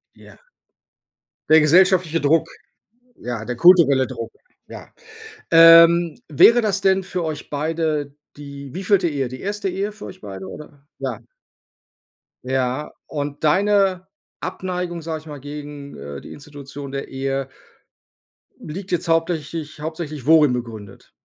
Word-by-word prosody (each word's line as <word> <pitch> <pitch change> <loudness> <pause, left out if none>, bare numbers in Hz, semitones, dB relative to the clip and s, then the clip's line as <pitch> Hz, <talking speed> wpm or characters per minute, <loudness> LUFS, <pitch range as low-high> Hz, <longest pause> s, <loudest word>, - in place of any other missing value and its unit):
Ja. - - -17 1.1
Der 160 0 +7
gesellschaftliche 175 +1 +3
Druck, 150 +3 +2 0.7
ja, 120 -3 -6
der 120 +2 -5
kulturelle 160 -5 +5
Druck, 115 -3 -7 0.3
ja. - - -11 0.6
Ähm, 165 0 +7
wäre 230 - +6
das 200 -3 0
denn 190 -1 +2
für 180 -1 -4
euch 155 -2 -5
beide 150 -1 -2 0.2
die 140 -2 -10
wievielte 190 0 +1
Ehe? 140 -5 -2
Die 130 +1 -9
erste 205 0 -3
Ehe 195 +3 -3
für 205 - -11
euch 100 - -11
beide 95 -2 -8
oder? 145 +4 -12
Ja. - - -4 1.3
Ja, 130 +2 -2 0.2
und 145 0 -5
deine 190 +2 +2 0.4
Abneigung, 180 -2 -4
sage 160 -1 -5
ich - - -21
mal, 145 -2 -8
gegen, 145 0 -9
äh, 70 0 -8
die - - -11
Institution 140 -1 -10
der 140 0 -5
Ehe 135 0 -3 1.1
liegt 185 +5 -8
jetzt 175 0 -1
hauptsächlich 165 -2 -2
hauptsächlich 155 -3 -6
worin 150 -3 +5
begründet? 110 -5 -8
150 Hz, 130 wpm, -21 LUFS, 140-175 Hz, 1.3 s, Der